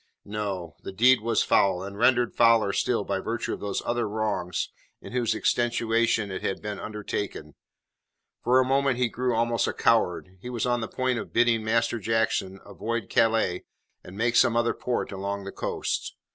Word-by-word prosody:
No. 100 -6 -4
The - - -7
deed 120 +5 +4
was 115 0 +1
foul, 95 -2 +2
and 100 +1 -7
rendered 120 +2 +3
fouler 115 -4 +4
still 115 -1 0
by 100 -1 -2
virtue 115 +4 -3
of - - -5
those 100 -1 -3
other 120 -2 -1
wrongs 100 -4 -2 0.3
in - - -11
whose 120 -2 0
extenuation 115 -3 +1
it 95 - -4
had 95 - -2
been 105 -1 -5
undertaken. 105 -7 -5 0.9
For 125 +2 +4
a 130 - +3
moment 135 -1 +2
he 125 -1 +1
grew 125 +1 -1
almost 115 0 +1
a - - -1
coward. 95 -4 +1
He 125 - -7
was 120 -2 -2
on 120 -1 +1
the 110 - -3
point 130 -2 -1
of - - -8
bidding 115 -2 +3
Master 115 +1 +1
Jackson 105 -3 0
avoid 115 -2 -4
Calais 115 -6 +2 0.4
and 95 +2 -11
make 120 +2 +1
some 115 0 +4
other 120 0 +2
port 125 - -3
along 100 +1 -4
the 100 - -6
coast. - - -3
115 Hz, 180 wpm, -26 LUFS, 100-120 Hz, 0.9 s, deed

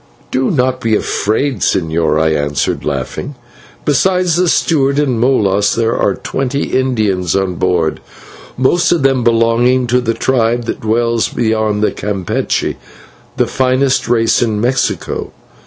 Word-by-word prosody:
"Do 130 0 0
not 130 -3 0
be 110 -1 +1
afraid, 110 +4 -1
señor," 80 -3 +1
I 80 0 +2
answered, 75 -2 -1
laughing; 145 - -4 0.5
"besides 180 +4 +2
the 180 +1 +2
steward 140 -5 +1
and 135 -6 +1
Molas 105 -5 +2
there 115 0 0
are 100 - +1
twenty 135 +1 -3
Indians 105 -9 0
on 95 -2 0
board, 85 -3 0 0.6
most 130 +7 +2
of 170 -5 +1
them 135 -2 +2
belonging 120 +2 +2
to 125 +1 +1
the 115 -2 -1
tribe 120 -2 0
that - - -4
dwells 115 +1 +1
beyond 110 -2 0
Campeche, 100 -4 -2 0.6
the - - +2
finest 130 0 0
race 115 -1 +2
in 110 -3 0
Mexico. 125 +4 -2
120 Hz, 135 wpm, -14 LUFS, 105-130 Hz, 0.6 s, I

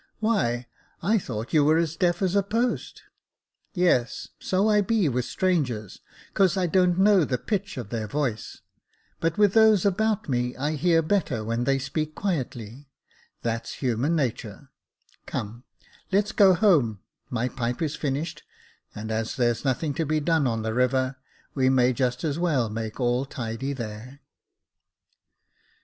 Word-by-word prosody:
" - - -44
Why, 125 - 0 0.4
I 215 +5 +3
thought 115 - -6
you 155 -2 +5
were 155 +2 +4
as 165 -1 0
deaf 175 +1 +1
as 190 0 +1
a 200 - +5
post." 230 +5 -2 0.4
" - - -66 0.3
Yes, 170 -10 +1
so 190 +3 +1
I 210 -1 +4
be 210 -3 +1
with 125 -2 -1
strangers, 130 - -1 0.3
'cause 195 0 +3
I 185 - +2
don't 180 0 +2
know 195 -2 +5
the 130 -4 -1
pitch 200 - -3
of 120 -5 -6
their 110 -1 -3
voice; 125 -2 -3 0.6
but 165 +3 -1
with 205 -2 +4
those 220 -4 +5
about 215 +2 +1
me 125 -2 -1
I 145 +3 -1
hear 165 +2 +2
better 155 - 0
when 115 +2 -1
they 135 +1 +2
speak 155 +3 -3
quietly 130 - -4 0.3
— - - -34
that's 115 0 -3
human 130 +5 0
natur. 120 -8 -3 0.6
Come, 115 +4 -5 0.5
let's 200 +2 +2
go 195 -3 +5
home, 145 - +3 0.3
my 125 0 -1
pipe 125 -2 -3
is 155 -2 -1
finished, 150 +3 -3 0.5
and 110 +1 -5
as 110 0 -2
there's 120 -3 0
nothing 140 +2 0
to 160 +3 -1
be 155 +1 +1
done 160 -2 +1
on 115 -2 -1
the 110 0 -2
river, 130 +2 +1 0.4
we 130 -2 +2
may 130 -1 +3
just 125 -1 -1
as 155 0 -1
well 140 -11 +1
make 110 +1 -5
all 125 +1 +1
tidy 130 -1 -4
there." 120 +1 -7
140 Hz, 165 wpm, -25 LUFS, 120-180 Hz, 0.6 s, you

